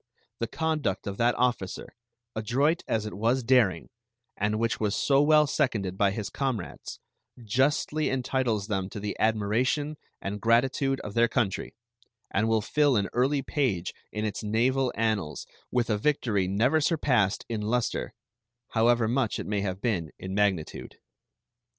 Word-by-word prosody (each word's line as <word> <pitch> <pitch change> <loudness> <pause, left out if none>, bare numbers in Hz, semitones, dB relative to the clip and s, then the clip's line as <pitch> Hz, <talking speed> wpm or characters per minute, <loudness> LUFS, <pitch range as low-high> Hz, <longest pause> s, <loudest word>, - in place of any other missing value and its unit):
The 115 - -1
conduct 150 -8 -1
of 100 -1 -4
that 120 +1 +2
officer, 120 -7 -1 0.4
adroit 135 +10 +1
as 110 -1 0
it 105 - -5
was 120 +5 +1
daring, 120 -6 +2 0.4
and 105 +1 0
which 115 +1 0
was 105 -1 0
so 135 +4 +3
well 150 +1 +5
seconded 115 -11 0
by 100 +1 +3
his 100 +1 -4
comrades, 130 -10 -4 0.4
justly 145 +6 +1
entitles 130 -5 0
them 95 -3 -2
to 105 - -7
the 105 0 -3
admiration 115 +8 +1 0.2
and 100 +1 -5
gratitude 130 +4 +2
of 105 - -7
their 115 +1 +4
country, 110 -8 -1 0.6
and 110 +3 +1
will 110 -1 +2
fill 145 +4 +2
an 100 -2 +1
early 135 +3 +1
page 120 - -1 0.2
in 105 0 -3
its 105 0 -3
naval 125 +5 +1
annals 110 -8 -1 0.2
with 125 -1 0
a 105 - +1
victory 110 -8 +1
never 115 +11 +2
surpassed 130 - +1
in 110 -2 -3
luster, 115 +3 -1 0.5
however 115 0 +3
much 120 -1 0
it - - -5
may 105 -1 -1
have 95 -1 -3
been 95 -10 -1
in 95 0 -6
magnitude. 100 -5 -1
115 Hz, 150 wpm, -27 LUFS, 105-130 Hz, 0.6 s, well